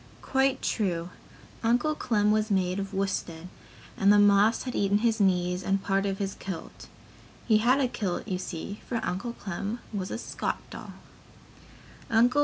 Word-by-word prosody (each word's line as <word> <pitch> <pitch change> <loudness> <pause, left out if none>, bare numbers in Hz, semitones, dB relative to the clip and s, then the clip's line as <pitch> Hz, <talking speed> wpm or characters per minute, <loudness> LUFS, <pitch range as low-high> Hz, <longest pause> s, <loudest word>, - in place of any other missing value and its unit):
Quite 265 0 +1
true. 180 -5 -1 0.5
Uncle 245 +7 +2
Clem 210 -7 +1
was 215 0 +1
made 185 -1 +1
of 195 0 -4
worsted 185 -3 -3 0.5
and 200 +1 +4
the 205 - +6
moths 205 +2 +5
had 250 - -4
eaten 200 0 +2
his 225 -1 +2
knees 180 -2 +2
and 195 +1 0
part 195 0 +1
of 195 -1 -2
his 195 -1 -2
kiltie. 190 -4 -8 0.6
He 215 -2 +5
had 250 +5 +4
a 265 - +3
kiltie, 210 -6 -3
you 180 - -1
see, 185 +3 -6
for 235 - -1
Uncle 235 +7 -3
Clem 200 +2 -4 0.2
was 195 -2 -3
a - - -3
Scotch - - -3
doll. - - -8
200 Hz, 160 wpm, -28 LUFS, 190-225 Hz, 0.6 s, the